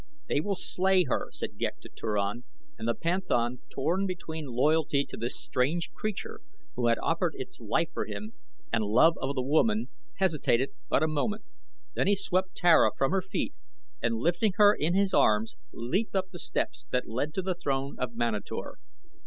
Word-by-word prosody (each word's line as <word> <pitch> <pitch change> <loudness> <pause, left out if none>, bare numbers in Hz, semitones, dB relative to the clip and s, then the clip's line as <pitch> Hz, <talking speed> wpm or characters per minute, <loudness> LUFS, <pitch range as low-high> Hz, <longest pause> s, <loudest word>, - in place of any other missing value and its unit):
"They 145 - +1
will 200 +4 -1
slay 185 0 +2
her," 135 - -1
said - - -6
Ghek - - -2
to - - -11
Turan, 105 +2 -2 0.3
and 115 -3 -5
the 115 - +1
panthan, 125 -9 0
torn 180 +8 0
between 160 -4 -5
loyalty 140 +3 +2
to - - -8
this 120 +2 -3
strange 150 +7 0
creature 215 -3 -4 0.3
who 120 -1 +1
had 115 - +4
offered - - +1
its - - -7
life - - 0
for - - -2
him, 105 +1 -6 0.4
and 115 -1 +2
love 120 +11 +5
of 140 +1 -1
the 130 - 0
woman, 210 - +2 0.3
hesitated 150 -8 +1 0.2
but 140 - +3
a - - +3
moment, 210 +8 -1 0.5
then - - +1
he 205 - +5
swept 185 -1 -1
Tara 175 -1 +6
from 135 - +2
her 195 0 +2
feet 190 - -3 0.5
and 115 0 +1
lifting 175 - +1
her 205 -1 +7
in 170 -1 0
his 195 -1 +2
arms 110 -5 +3 0.2
leaped 180 - -2
up 190 -1 0
the 175 - -8
steps 180 +2 -3
that 125 - 0
led 130 +7 -2
to 190 - -1
the 185 0 0
throne 140 -5 -2
of 125 -2 -3
Manator. 120 - -3
155 Hz, 180 wpm, -29 LUFS, 120-185 Hz, 0.5 s, her